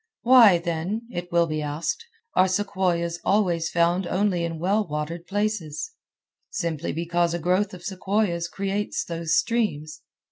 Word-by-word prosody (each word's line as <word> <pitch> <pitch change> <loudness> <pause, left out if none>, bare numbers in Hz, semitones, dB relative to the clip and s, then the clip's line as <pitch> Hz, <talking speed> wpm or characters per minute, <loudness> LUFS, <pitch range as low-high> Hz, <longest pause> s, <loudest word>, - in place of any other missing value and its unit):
"Why, 235 -7 +8
then," 170 +6 -3
it 175 -2 -5
will 170 0 +4
be 155 -1 -3
asked, 150 - -3 0.3
"are 185 - +5
sequoias 185 -3 0
always 175 -5 +1
found 175 +2 +1
only 185 -3 +1
in 165 -1 -3
well 200 +6 +1
watered 155 +3 -4
places?" 205 - -2 0.6
Simply 170 -7 -2
because 170 +1 0
a - - 0
growth 185 +5 +1
of 175 - -13
sequoias 190 -2 -1
creates 200 +3 -2
those 165 -1 0
streams. 155 -10 -1
175 Hz, 140 wpm, -25 LUFS, 165-200 Hz, 0.6 s, Why